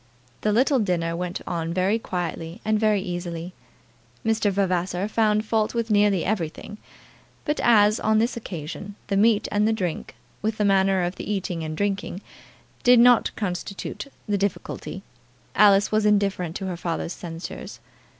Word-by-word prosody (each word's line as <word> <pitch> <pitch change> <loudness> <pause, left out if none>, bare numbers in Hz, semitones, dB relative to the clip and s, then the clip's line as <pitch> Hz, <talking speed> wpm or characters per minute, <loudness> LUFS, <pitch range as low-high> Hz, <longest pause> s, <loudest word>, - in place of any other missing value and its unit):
The 210 - +1
little 255 +5 +3
dinner 170 -5 0
went 180 +1 -4
on 165 -1 -3 0.2
quietly 175 -3 -4
and 215 0 +2
very 210 -3 +2
easily. 175 -1 -5 0.7
Mr. 220 -1 +2
Vavasor 185 -1 0
found 215 -1 +2
fault 220 +1 0
with 230 -1 -1
nearly 205 -3 +3
everything. 195 +1 -3 0.7
But 295 - -1
as, 215 -2 +5
on 220 0 +2
this 230 +3 +1
occasion, 195 -1 -7
the 200 - +1
meat 210 +1 +3
and 210 +1 +2
the - - +3
drink, 180 -7 -3 0.3
with 220 +1 -1
the 210 - +1
manner 195 -1 +3
of 175 +1 -3
the - - -4
eating 180 -4 -2
and 155 0 -5
drinking, 200 -2 -2 0.6
did 245 -1 +6
not 245 0 +6
constitute 200 +5 -4 0.2
the 205 -1 0
difficulty, 195 0 -3 0.5
Alice 205 -1 +5
was 215 0 +2
indifferent 200 -5 +1
to 195 - -4
her 180 -2 -3
father's 170 0 -3
censures. 165 -1 -8
200 Hz, 150 wpm, -24 LUFS, 180-215 Hz, 0.7 s, did